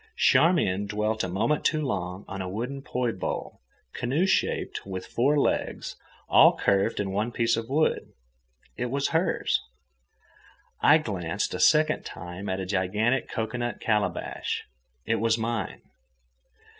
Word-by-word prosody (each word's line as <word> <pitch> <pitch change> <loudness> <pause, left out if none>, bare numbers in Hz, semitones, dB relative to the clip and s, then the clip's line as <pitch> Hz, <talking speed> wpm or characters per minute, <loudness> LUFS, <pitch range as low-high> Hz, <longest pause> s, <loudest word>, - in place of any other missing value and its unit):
Charmian 130 - +3
dwelt 105 +1 -1
a - - -1
moment 115 +11 0
too 155 0 +1
long 90 -6 -3
on 95 0 -5
a 90 - -4
wooden 125 +8 -4
poi 125 -3 -1
bowl, 95 - -5 0.3
canoe 140 +10 0
shaped, 190 - 0
with 95 -1 -6
four 140 +5 +1
legs, 140 - -1 0.3
all - - +7
carved 100 -1 +1
in 100 -2 -1
one 105 +5 -1
piece 115 -1 +1
of 115 +1 -4
wood; 155 +3 +1 0.6
it 125 - -2
was 140 +3 -1
hers. 165 +3 +1 1.2
I 150 - +7
glanced 100 - -3
a - - -3
second 155 0 +4
time 90 +3 -7
at 95 0 -1
a 95 - -3
gigantic 105 +7 0
cocoanut 120 +2 -3
calabash; 105 -2 -1 0.4
it 115 - +1
was 115 0 +2
mine. 115 -4 -3
115 Hz, 140 wpm, -27 LUFS, 95-130 Hz, 1.2 s, all